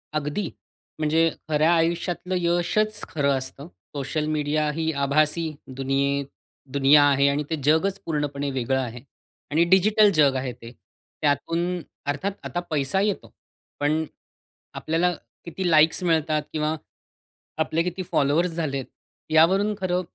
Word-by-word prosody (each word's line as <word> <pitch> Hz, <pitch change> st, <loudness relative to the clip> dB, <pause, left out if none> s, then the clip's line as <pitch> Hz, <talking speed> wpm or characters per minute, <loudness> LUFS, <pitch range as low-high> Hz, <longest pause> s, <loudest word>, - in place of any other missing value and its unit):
अगदी, 150 Hz, +6 st, -2 dB, 0.5 s
म्हणजे 160 Hz, +2 st, +3 dB, 0.2 s
खऱ्या 155 Hz, +2 st, +3 dB
आयुष्यातलं 170 Hz, +2 st, 0 dB
यशच 175 Hz, +5 st, 0 dB
खरं 140 Hz, -3 st, +1 dB
असतं. 135 Hz, +3 st, -7 dB, 0.3 s
सोशल 145 Hz, +2 st, -2 dB
मीडिया 150 Hz, 0 st, 0 dB
ही 160 Hz, +1 st, -1 dB
आभासी 155 Hz, +3 st, +1 dB, 0.2 s
दुनिये 140 Hz, +1 st, 0 dB, 0.5 s
दुनिया 140 Hz, +1 st, +6 dB
आहे 140 Hz, -1 st, +4 dB
आणि 145 Hz, +1 st, 0 dB
ते 160 Hz, -, 0 dB
जगच 160 Hz, +7 st, +2 dB
पूर्णपणे 145 Hz, -3 st, -2 dB
वेगळं 130 Hz, 0 st, 0 dB
आहे 125 Hz, -2 st, -5 dB, 0.5 s
आणि 160 Hz, +3 st, +4 dB
डिजिटल 205 Hz, +3 st, +5 dB
जग 140 Hz, -3 st, +4 dB
आहे 130 Hz, -1 st, -2 dB
ते. 115 Hz, 0 st, -12 dB, 0.5 s
त्यातून 165 Hz, +5 st, 0 dB, 0.3 s
अर्थात 145 Hz, +8 st, -1 dB
आता 175 Hz, -, -3 dB
पैसा 145 Hz, +4 st, 0 dB
येतो, 205 Hz, -1 st, -2 dB, 0.5 s
पण 155 Hz, +2 st, +1 dB, 0.7 s
आपल्याला 170 Hz, +3 st, 0 dB, 0.3 s
किती 175 Hz, +2 st, -2 dB
लाईक्स 160 Hz, +2 st, +4 dB
मिळतात 160 Hz, -3 st, +1 dB
किंवा 155 Hz, 0 st, 0 dB, 0.8 s
आपले 160 Hz, +1 st, +1 dB
किती 180 Hz, +1 st, -3 dB
फॉलोवर्स 160 Hz, +3 st, +2 dB
झाले 155 Hz, -4 st, -2 dB
आहेत, 130 Hz, -, -4 dB, 0.5 s
यावरून 190 Hz, +7 st, +4 dB
खरं 180 Hz, -1 st, 0 dB
155 Hz, 130 wpm, -24 LUFS, 145-175 Hz, 0.8 s, दुनिया